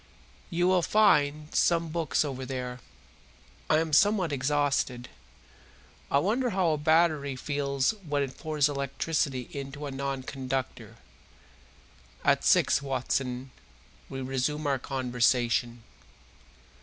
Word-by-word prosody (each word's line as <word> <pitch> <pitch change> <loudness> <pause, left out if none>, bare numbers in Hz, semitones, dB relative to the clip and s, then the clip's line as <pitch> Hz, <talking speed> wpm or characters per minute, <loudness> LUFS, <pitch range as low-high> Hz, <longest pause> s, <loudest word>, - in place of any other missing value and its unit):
You 175 0 +1
will 185 -1 +4
find 150 -7 +2
some 170 -1 +2
books 155 -4 0
over 130 -2 -5
there. 125 -1 -5 0.9
I 155 - +5
am 160 -1 -1
somewhat 195 0 +4
exhausted; 140 -3 0 1.0
I - - +3
wonder 225 - +1
how 185 -5 +1
a 155 - 0
battery 155 -3 +2
feels 140 0 0
when 155 -10 -2
it 135 -1 -6
pours 150 -2 +1
electricity 140 -1 -2
into 140 +1 -6
a 140 - -5
non 135 0 -3
conductor? 130 -1 -4 1.3
At - - +3
six, 140 - +4
Watson, 130 -1 -2 0.6
we 135 - -5
resume 135 +4 -2
our 140 -2 +1
conversation." 120 -2 0
140 Hz, 115 wpm, -28 LUFS, 130-155 Hz, 1.3 s, I